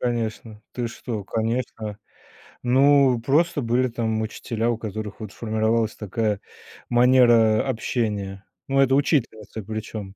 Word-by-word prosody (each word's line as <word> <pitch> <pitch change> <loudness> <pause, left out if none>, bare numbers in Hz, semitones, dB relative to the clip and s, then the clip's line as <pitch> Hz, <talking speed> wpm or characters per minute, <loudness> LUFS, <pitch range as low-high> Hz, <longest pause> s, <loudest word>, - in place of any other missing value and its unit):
Конечно. 115 -2 -3
Ты 120 -2 -3
что, 115 -3 -6
Конечно. 110 -1 -3 0.7
Ну 135 0 +4
просто 145 +5 +2
были 125 +2 +1
там 110 -2 -1
учителя, 115 +1 -2
у 120 - 0
которых 110 -1 -6
вот 105 -3 -7
формировалась 110 0 0
такая 105 0 -2 0.5
манера 120 -3 +5
общения. 105 -4 -2 0.2
Но 135 0 +3
это 135 0 +4
учительницы 115 - 0
причём. 110 -1 -6
115 Hz, 120 wpm, -23 LUFS, 110-125 Hz, 0.7 s, манера